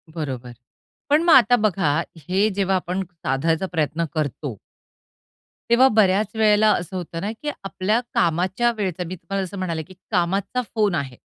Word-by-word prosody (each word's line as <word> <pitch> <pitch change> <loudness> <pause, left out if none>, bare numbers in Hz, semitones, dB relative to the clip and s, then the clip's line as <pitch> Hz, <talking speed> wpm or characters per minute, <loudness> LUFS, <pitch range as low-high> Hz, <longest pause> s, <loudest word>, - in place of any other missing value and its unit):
बरोबर. 130 -6 -5 0.6
पण 295 +2 +4
मग 340 -1 +5
आता 245 -3 +7
बघा, 190 -9 +1 0.2
हे 185 +7 +1
जेव्हा 195 -1 +1
आपण 185 +1 -2
साधायचा 165 0 -1
प्रयत्न 160 0 0
करतो, 145 -5 -3 1.1
तेव्हा 245 +3 +6
बऱ्याच 200 -1 +4
वेळेला 215 -1 +4
असं 175 +1 -4
होतं 165 -2 -5
ना 205 - -2
की 300 - -2
आपल्या 195 +3 0
कामाच्या 185 +8 +1
वेळचा, 185 -4 -2
मी 185 - -5
तुम्हाला 190 +3 -4
जसं 185 +2 -9
म्हणाले 170 -4 -3
की 185 - -15 0.2
कामाचा 195 +6 0
फोन 210 -5 +2
आहे. 135 -4 -3
185 Hz, 155 wpm, -22 LUFS, 165-210 Hz, 1.1 s, आता